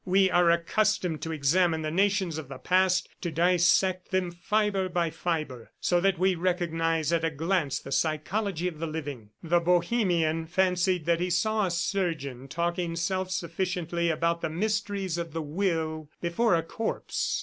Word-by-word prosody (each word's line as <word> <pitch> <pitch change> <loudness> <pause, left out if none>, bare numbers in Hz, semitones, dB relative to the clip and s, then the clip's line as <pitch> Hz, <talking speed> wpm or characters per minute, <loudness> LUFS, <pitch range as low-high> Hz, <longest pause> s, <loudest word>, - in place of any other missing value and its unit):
"We 190 0 +3
are 175 -1 +4
accustomed 170 0 +1
to 165 - -4
examine 160 +2 +2
the 155 - -2
nations 190 -2 +1
of 150 - -8
the 135 - -7
past, 185 +3 +2
to 175 - -2
dissect 180 +2 +2
them 185 -2 0
fibre 195 +1 0
by 170 -2 0
fibre, 155 -10 -3
so 175 -1 +2
that 195 -1 +2
we 185 +2 +3
recognize 165 -3 0
at 165 -1 +1
a 165 - +2
glance 160 -2 0
the 135 - -8
psychology 170 +5 -1
of 165 -4 -6
the 165 - -2
living." 145 -8 -6
The 170 +1 +3
Bohemian 175 -2 +1
fancied 180 -1 +1
that 170 0 +2
he 180 +1 -1
saw 210 +3 +1
a - - -1
surgeon 165 -8 -2
talking 170 +2 -2
self 185 +2 -1
sufficiently 170 -1 -2
about 170 +1 0
the 165 - -1
mysteries 200 -1 -1
of 170 -2 -5
the 165 -1 -3
will 160 -2 -2
before 175 +4 +2
a 165 - 0
corpse. 220 +7 -2
170 Hz, 165 wpm, -27 LUFS, 160-185 Hz, -, are